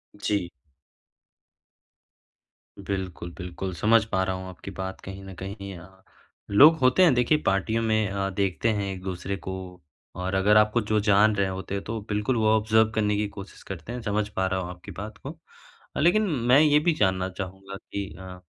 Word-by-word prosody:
जी। 100 -3 -1 2.4
बिल्कुल, 95 -3 -4
बिल्कुल 90 +1 -5
समझ 110 +5 +4
पा 95 -4 0
रहा 95 0 -1
हूँ 95 0 -7
आपकी 95 +2 -9
बात 95 0 -6
कहीं 95 0 -9
न 95 - -9
कहीं 100 +1 -7
अ, 95 +3 -16 0.5
लोग 145 +11 +8
होते 130 +7 +4
हैं 170 -6 +6
देखिए 125 +5 +3
पार्टियों 110 +4 +1
में 110 -1 +2
अ, 100 0 -2
देखते 95 +2 0
हैं 100 -1 -2
एक-दूसरे 95 +1 -5
को 95 0 -6 0.6
और 90 +1 -3
अगर 100 +2 +4
आपको 105 +2 +3
जो 110 0 +1
जान 105 +1 +4
रहे 100 -1 +1
होते 95 +1 -4
तो 115 0 -2
बिल्कुल 105 +4 0
वो 110 -1 +2
ऑब्जर्व 110 0 +3
करने 105 -1 +1
की 105 0 0
कोशिश 100 -1 -11
करते 95 +3 -7
हैं, 125 0 -5
समझ 105 -1 -1
पा 95 -3 -1
रहा 95 0 -1
हूँ 90 -1 -5
आपकी 90 -1 -10
बात 105 +2 -8
को। 150 +4 -9 0.6
लेकिन 175 +8 +4 0.3
मैं 135 - +8
ये 150 -1 +5
भी 165 +2 +2
जानना 95 -4 +1
चाहूँगा 95 +1 -7
कि 100 0 -6
अ, 95 -1 -9
100 Hz, 180 wpm, -26 LUFS, 95-110 Hz, 2.4 s, लोग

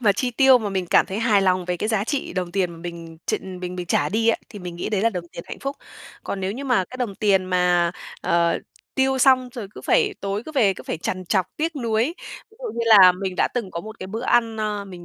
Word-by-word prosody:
mà 210 -4 +4
chi 245 +6 -1
tiêu 265 +1 +6
mà 215 -3 -3
mình 190 -2 -2
cảm - - +4
thấy 195 +3 -4
hài 220 -4 +3
lòng 185 -1 +2
về 180 0 -2
cái 210 - -2
giá 215 -3 +1
trị 280 +3 -3
đồng 180 -2 -3
tiền 185 -2 0
mà 170 - -10
mình 165 -1 -8
tr - - +1
mình 180 -1 -6
mình 180 -1 -5
trả 145 -2 +1
đi 225 +5 +1
á, 230 - +4
thì 210 - -10
mình 180 -2 -7
nghĩ - - -3
đấy 205 -3 0
là 230 +2 +3
đồng 175 -4 -6
tiền 170 - -8
hạnh - - -7
phúc. 275 +1 -4 0.5
Còn 195 - -4
nếu 190 +1 -2
như 265 +6 -6
mà 250 -8 +2
cái 255 - -8
đồng 240 -6 -3
tiền 195 -2 +2
mà, 180 -2 +2 0.3
ờ, 170 0 +2 0.4
tiêu 265 0 +2
xong 255 -1 +4
rồi 220 -5 -6
cứ - - -9
phải 415 -4 +2
tối 200 +1 -2
cứ 315 - -7
về 210 -9 +3
cứ - - -10
phải - - -4
trằn 185 +3 -3
trọc 185 0 +1
tiếc 320 0 -2
nuối, 230 -4 +1 0.5
ví 440 - -22
dụ - - -10
như 235 - -3
là 195 -5 +9
mình 185 0 -4
đã - - +2
từng 230 -6 -2
có 170 - -4
một 220 +4 -10
cái 185 - -6
bữa 220 +5 -5
ăn, 230 -3 +2
ờ, 210 -2 -2
mình 180 -3 -10
200 Hz, 275 wpm, -23 LUFS, 180-235 Hz, 0.5 s, là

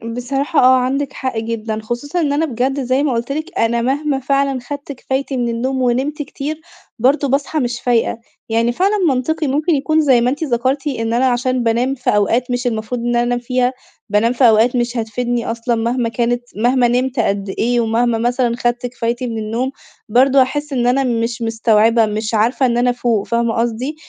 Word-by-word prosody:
بصراحة 270 +5 -1
آه، 255 +1 +6
عندِك 275 +2 -1
حق 260 -4 -4
جدًا. 220 -1 -3
خصوصًا 240 +9 -3
إن 290 -3 +1
أنا 305 +3 +1
بجد- 265 +1 -1
زي 255 +3 +1
ما 285 -4 +1
قلت 235 +3 -2
لِك- 315 +5 -4
أنا 235 +1 +1
مهما 275 +2 0
فعلًا 275 0 0
أخدت 285 +3 -7
كفايتي 265 0 -3
مِن 240 -1 0
النوم 255 +3 -2
ونمت 265 +5 0
كتير، 295 +2 -5 0.4
برضه 275 +4 +2
باصحى 275 +3 0
مش 240 -2 -2
فايقة. 235 -2 +1 0.3
يعني 230 +1 +1
فعلًا 390 - +1
منطقي 300 +4 -1
ممكن 300 +5 +1
يكون- 310 +3 +1
زي 260 -5 +4
ما 245 - +2
أنتِ 290 +4 -3
ذكرتِ- 265 +2 0
إن 225 0 -1
أنا 250 +2 +2
عشان 250 0 0
بانام 240 +4 +1
في 250 - -2
أوقات 230 +5 +1
مش 245 0 -1
المفروض 225 +1 -3
إن 240 - -3
أنا 240 0 +2
أنام 245 0 0
فيها، 250 +1 0 0.4
بانام 215 +4 +2
في 250 0 +4
أوقات 225 +3 +3
مش 240 0 -1
هتفيدني 235 +1 -2
أصلًا 235 +1 -1
مهما 235 +1 -1
كانت، 240 +1 -1
مهما 245 +3 +2
نمت 250 +2 0
قد 200 -3 0
إيه 240 +5 0
ومهما 230 +1 +1
مثلًا 240 +1 0
أخدت 240 +1 -1
كفايتي 240 0 -3
مِن 225 - -4
النوم، 225 +5 -2 0.4
برضه 260 +4 +5
هاحس 290 +3 -1
إن 245 -2 +1
أنا 270 +2 +2
مش 235 -1 -1
مستوعبة، 225 0 +3
مش 215 +1 -3
عارفة 230 +5 +2
إن 240 -1 +1
أنا 245 +1 +2
أفوق، 240 -4 0
فاهمة 235 -1 0
قصدي؟ 240 +5 -2
245 Hz, 195 wpm, -18 LUFS, 230-270 Hz, 0.4 s, آه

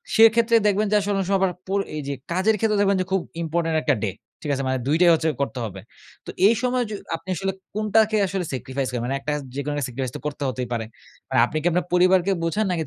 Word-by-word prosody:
সেক্ষেত্রে 225 +1 +6
দেখবেন 205 +1 +2
যে - - +4
আসলে 205 0 -1
ওনেক 195 -1 0
সময় 195 -1 +3
আবার 190 -2 +2
পর 195 +1 0 0.2
এইযে 140 -2 -3 0.2
কাজের 190 +5 +2
ক্ষেত্রে 215 0 +1
দেখবেন 200 -1 +3
যে - - -2
খুব 190 -1 +2 0.2
ইম্পোর্টেন্ট 165 0 -1
একটা 145 - +2
ডে, 105 - +1 0.3
ঠিক 150 - -5
আছে? 135 0 -2
মানে 130 0 +1
দুইটাই 165 +5 +4
হচ্ছে 160 0 +1
করতে 135 -2 -2
হবে। 100 -3 -7 0.5
তো - - -9 0.2
এই 220 - +5
সময় 250 0 +1
য - - -8 0.2
আপনি 165 +3 -11
আসলে 195 +2 -1 0.2
কোনটাকে 215 +1 +2
আসলে 190 0 -2
স্যাক্রিফাইস 130 0 -3
করেন? 120 -2 -3
মানে 135 +2 -1
একটা 135 +2 -3 0.2
যেকোনো 140 +1 -2
একটা 145 -2 -1
স্যাক্রিফাইস 130 0 -4
তো - - -11
করতে 145 -1 -5
হতেই 125 0 -4
পারে। 115 -1 -2 0.4
মানে 130 - +2
আপনি 155 - -4
কি - - -9
আপনার 180 +2 0
পরিবারকে 185 +1 +4
বোঝান 185 +6 0
নাকি 170 -2 -1
175 Hz, 235 wpm, -23 LUFS, 140-200 Hz, 0.5 s, সেক্ষেত্রে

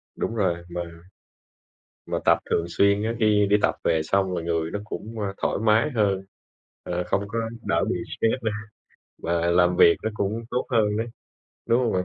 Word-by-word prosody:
Đúng 115 - -3
rồi, 85 -5 0
mà 85 0 -3 1.3
mà - - -1
tập - - +5
thường 85 - +2
xuyên 100 +3 +3
á, 115 +2 -1
khi 105 -2 +4
đi 105 - +6
tập - - +3
về 80 -1 +2
xong 95 +3 +1
là 85 - -2
người 85 -1 -1
nó 105 - -3
cũng, 110 +1 -7
ơ, 100 -1 -2
thoải - - +1
mái 110 +7 +3
hơn. 100 -4 +1 0.6
Ờ, 90 0 -2
không 95 +3 0
có 115 +3 -2 0.3
đỡ - - +2
bị - - 0 0.2
stress 115 +2 +1
nữa, 110 - +1 0.7
mà 85 0 +1
làm 90 0 +3
việc 85 -2 +7
nó 110 - -1
cũng 105 +2 -2
tốt 125 - -1
hơn 105 -3 +2
đấy, 115 +1 -1 0.6
đúng 115 +2 +3
hông 120 -3 +1
bạn? 90 0 0
100 Hz, 195 wpm, -25 LUFS, 90-110 Hz, 1.3 s, việc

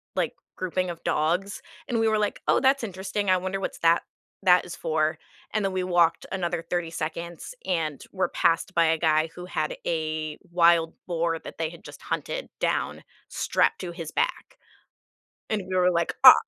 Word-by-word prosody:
like, - - 0 0.2
grouping 185 0 -1
of 170 -1 -7
dogs. 180 +6 0 0.3
And 235 -2 +1
we 225 - +3
were 220 0 +3
like, 210 -1 -1
"Oh, - - +5
that's 270 -1 +3
interesting. 195 0 -2
I 185 - +6
wonder 185 +2 -3
what's - - -4
that 165 0 +4 0.4
that 180 -1 +6
is 175 - -7
for?" 155 -1 0 0.3
And 210 -2 0
then 195 - -1
we 185 -1 0
walked 175 -2 +3
another 175 -3 -1
30 170 0 -2
seconds 170 - -5
and 160 -5 -1
were 190 -1 0
passed 170 +2 +1
by 170 -2 +4
a 160 0 +3
guy 155 0 +3
who 180 - -7
had 165 -4 -2
a 155 -2 -2
wild 170 -1 +4
boar 165 -1 0
that - - -10
they 160 -1 -1
had 170 +4 -13
just - - -11
hunted - - -3
down - - -1 0.2
strapped - - +1
to 180 - -4
his 165 -2 -7
back. - - -1 0.9
And 210 -2 -1
we 185 - -1
were 180 0 +4
like, 170 0 +1
"Ah." - - +14
175 Hz, 185 wpm, -26 LUFS, 165-190 Hz, 0.9 s, Ah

